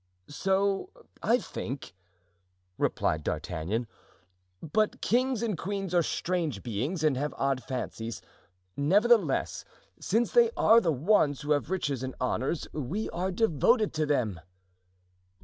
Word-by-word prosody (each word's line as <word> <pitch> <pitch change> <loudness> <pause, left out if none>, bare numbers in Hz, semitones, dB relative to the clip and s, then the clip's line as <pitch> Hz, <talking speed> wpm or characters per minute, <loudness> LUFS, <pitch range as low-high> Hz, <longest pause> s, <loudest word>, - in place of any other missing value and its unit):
"So 195 - 0 0.3
I 235 - +3
think," 135 - -6 0.9
replied 75 0 0
D'Artagnan; 100 +14 -2 0.7
"but 210 +7 0
kings 250 -1 +1
and 220 -4 0
queens 195 0 -4
are 175 - +5
strange 165 - -2
beings 130 - -2
and 150 -3 +3
have 145 +2 -2
odd 135 -2 0
fancies; 115 -3 -4 0.6
nevertheless, 195 - +2 0.4
since 230 +5 +1
they 475 -1 +5
are 230 +1 +6
the 170 - +1
ones 150 -1 +2
who 150 +1 -3
have 145 +1 +1
riches 145 -9 -1
and 130 0 -5
honors, 130 +4 -1
we 155 - -3
are 180 +2 -2
devoted 215 - +2
to 155 -1 0
them." 115 - 0
160 Hz, 125 wpm, -29 LUFS, 135-205 Hz, 0.9 s, are